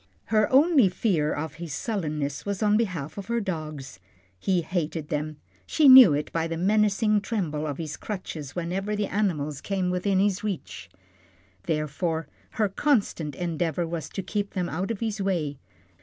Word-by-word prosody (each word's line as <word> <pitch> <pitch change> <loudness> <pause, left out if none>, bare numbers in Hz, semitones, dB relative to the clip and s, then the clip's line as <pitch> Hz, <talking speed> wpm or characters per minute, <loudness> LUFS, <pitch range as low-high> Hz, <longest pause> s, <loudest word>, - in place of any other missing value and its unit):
Her 215 -1 +3
only 275 - +5
fear 175 -6 0
of 150 0 -3
his 160 -4 -4
sullenness 150 - -3
was 200 +1 -2
on 210 0 +4
behalf 180 -7 -2
of 195 - -8
her 235 0 0
dogs. 155 - -5 0.4
He 180 - +1
hated 160 -3 -3
them 150 0 -3 0.3
she 305 - +4
knew 260 - +11
it 145 +1 -2
by 165 0 -1
the 165 0 -3
menacing 210 +2 +2
tremble 170 -8 -2
of 145 -2 -4
his 155 -2 -5
crutches 160 -8 -6
whenever 190 +4 -2
the 205 0 0
animals 155 -9 -1
came 190 -2 -1
within 185 +2 +1
his 200 0 +1
reach. 195 - -5 0.8
Therefore, 160 +1 -1 0.3
her 215 -2 +3
constant 195 - 0
endeavour 170 0 -1
was 165 -3 -5
to 195 - -5
keep 200 +2 -3
them 180 -2 0
out 185 +5 -3
of 230 -2 -3
his 220 -2 -2
way. 160 -8 -1
180 Hz, 165 wpm, -26 LUFS, 155-205 Hz, 0.8 s, knew